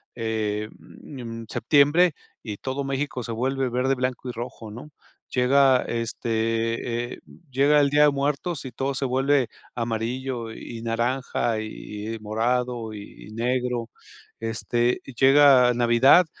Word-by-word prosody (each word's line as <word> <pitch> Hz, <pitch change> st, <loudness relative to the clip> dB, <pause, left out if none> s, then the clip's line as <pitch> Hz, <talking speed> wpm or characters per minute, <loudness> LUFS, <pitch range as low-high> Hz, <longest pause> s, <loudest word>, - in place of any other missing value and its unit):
eh, 110 Hz, -2 st, -2 dB
mm, 115 Hz, -5 st, -9 dB
septiembre 150 Hz, +6 st, +4 dB, 0.3 s
y 105 Hz, -3 st, -6 dB
todo 135 Hz, +1 st, -3 dB
México 135 Hz, -1 st, -3 dB
se 115 Hz, -, -5 dB
vuelve 130 Hz, +3 st, -1 dB
verde, 125 Hz, +2 st, +1 dB
blanco 130 Hz, 0 st, -3 dB
y -, -, -2 dB
rojo, 115 Hz, -2 st, -7 dB
¿no? 125 Hz, +7 st, -10 dB, 0.4 s
Llega, 130 Hz, +1 st, +4 dB
este, 115 Hz, +1 st, -2 dB
eh, -, -, -10 dB, 0.3 s
llega 145 Hz, +3 st, +4 dB
el 140 Hz, -, +3 dB
Día 150 Hz, 0 st, +5 dB
de 150 Hz, -, +7 dB
Muertos 140 Hz, +3 st, -2 dB
y 130 Hz, -, -6 dB
todo 135 Hz, 0 st, -2 dB
se 135 Hz, -, -1 dB
vuelve 135 Hz, 0 st, +2 dB, 0.3 s
amarillo 115 Hz, +1 st, -3 dB
y 115 Hz, 0 st, -8 dB
naranja 120 Hz, 0 st, -1 dB
y 110 Hz, 0 st, -6 dB
y -, -, -8 dB
morado 115 Hz, +1 st, -1 dB
y 105 Hz, 0 st, -11 dB
y -, -, -12 dB
negro. 125 Hz, 0 st, -1 dB, 0.5 s
Este, 120 Hz, +2 st, 0 dB
llega 135 Hz, -2 st, +6 dB
Navidad 120 Hz, +8 st, +5 dB
125 Hz, 135 wpm, -24 LUFS, 115-135 Hz, 0.5 s, de